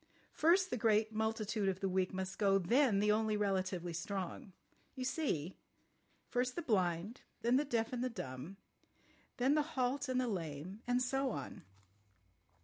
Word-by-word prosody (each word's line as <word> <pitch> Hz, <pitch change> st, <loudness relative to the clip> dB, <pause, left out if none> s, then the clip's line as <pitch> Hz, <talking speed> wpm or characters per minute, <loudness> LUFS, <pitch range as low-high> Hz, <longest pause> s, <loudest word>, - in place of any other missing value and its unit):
First 365 Hz, +4 st, +4 dB
the -, -, 0 dB
great 220 Hz, 0 st, +2 dB
multitude 220 Hz, -2 st, 0 dB
of 190 Hz, -1 st, -2 dB
the 195 Hz, -, 0 dB
weak 185 Hz, 0 st, +1 dB
must 190 Hz, 0 st, -4 dB
go, 195 Hz, -2 st, +4 dB
then 210 Hz, +3 st, +3 dB
the 210 Hz, 0 st, +4 dB
only 215 Hz, 0 st, +2 dB
relatively 185 Hz, -4 st, -1 dB
strong. 195 Hz, +1 st, -4 dB, 0.4 s
You 255 Hz, -, -4 dB
see? 190 Hz, -, -1 dB, 0.7 s
First 250 Hz, +1 st, 0 dB
the 345 Hz, -, -3 dB
blind, 190 Hz, -, 0 dB, 0.2 s
then 240 Hz, +2 st, +4 dB
the 295 Hz, -, +1 dB
deaf 230 Hz, -3 st, -1 dB
and 250 Hz, 0 st, -1 dB
the 255 Hz, -, 0 dB
dumb, 175 Hz, -, -7 dB, 0.8 s
then 260 Hz, +3 st, +3 dB
the 305 Hz, -, +4 dB, 0.2 s
halt 260 Hz, +2 st, 0 dB
and 255 Hz, 0 st, +1 dB
the 255 Hz, -, +1 dB
lame—and 195 Hz, -, -2 dB
so 270 Hz, +1 st, 0 dB
on. 140 Hz, -, -5 dB
215 Hz, 155 wpm, -36 LUFS, 190-250 Hz, 0.8 s, First